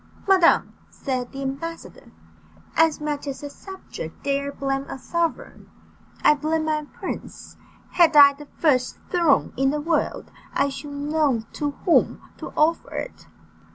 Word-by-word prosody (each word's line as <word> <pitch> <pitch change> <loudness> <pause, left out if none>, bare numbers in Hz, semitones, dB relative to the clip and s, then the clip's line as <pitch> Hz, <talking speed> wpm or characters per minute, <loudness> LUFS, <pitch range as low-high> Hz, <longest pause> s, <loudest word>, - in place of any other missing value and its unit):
"Madam," 375 -3 +4 0.2
said 255 -3 -4
the 275 0 -6
ambassador, 330 +5 -6 0.6
"as 325 -2 +3
much 295 -1 -3
as 275 +1 -5
a 285 - -6
subject 385 +4 -9
dare 280 0 -1
blame 275 0 -2
a - - -5
sovereign, 335 +5 -3 0.5
I - - +7
blame 315 +2 -1
my 305 -1 -1
prince; - - -7 0.4
had 340 -3 +4
I 285 -1 +9
the 290 +1 -13
first 260 -6 +1
throne 340 -7 +3
in 270 +1 +2
the 300 +2 -1
world, 320 +1 -1 0.2
I 280 0 +2
should 275 +2 -7
know 285 -4 0
to 290 -1 -2
whom 345 - +3 0.2
to - - -6
offer 320 +2 +1
it." - - -6
295 Hz, 145 wpm, -23 LUFS, 275-320 Hz, 0.6 s, I